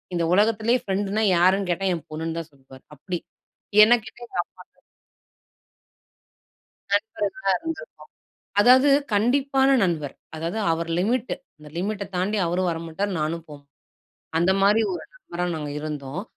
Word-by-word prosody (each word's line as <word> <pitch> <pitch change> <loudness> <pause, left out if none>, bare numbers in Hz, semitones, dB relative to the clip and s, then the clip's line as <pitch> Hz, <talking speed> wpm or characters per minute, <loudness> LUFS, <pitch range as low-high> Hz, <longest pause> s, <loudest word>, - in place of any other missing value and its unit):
இந்த 170 - +1
உலகத்திலேயே 220 +4 +3
பிரெண்ட்ன்னா 200 +2 0
யாருன்னு 185 +2 +3
கேட்டா 195 +3 -1
என் 165 - -5
பொண்ணுன்னு 160 +1 -4
தான் 165 -1 -8
சொல்வாரு 135 -1 -17
அப்டி. 175 +5 -4 0.6
என்ன 225 +3 +6
கேட்ட 220 - -12
எங்க - - -8
அப்பா 185 - -18
தான். - - -36 2.1
நண்பர்களா 205 +3 0
இருந்துருக்கோம். 325 - -7 0.6
அதாவது 255 +5 +6 0.2
கண்டிப்பான 265 +5 +3
நண்பர். 160 -6 -1 0.2
அதாவது 165 +7 -3
அவர் 165 +1 -2
லிமிட்டு 235 +6 0 0.2
அந்த 150 0 -13
லிமிட்ட 200 +2 -2
தாண்டி 200 +4 0
அவரும் 180 +1 0
வரமாட்டார். 165 +5 -3
நானும் 160 +2 -2
போமாட்டேன். 145 -2 -13 0.7
அந்த 175 +3 +3
மாரி 210 +3 +5
ஒரு - - -6
நண்பரா 180 - -5
நாங்க 150 -1 -5
இருந்தோம். 150 +2 -5
185 Hz, 130 wpm, -24 LUFS, 165-215 Hz, 2.1 s, என்ன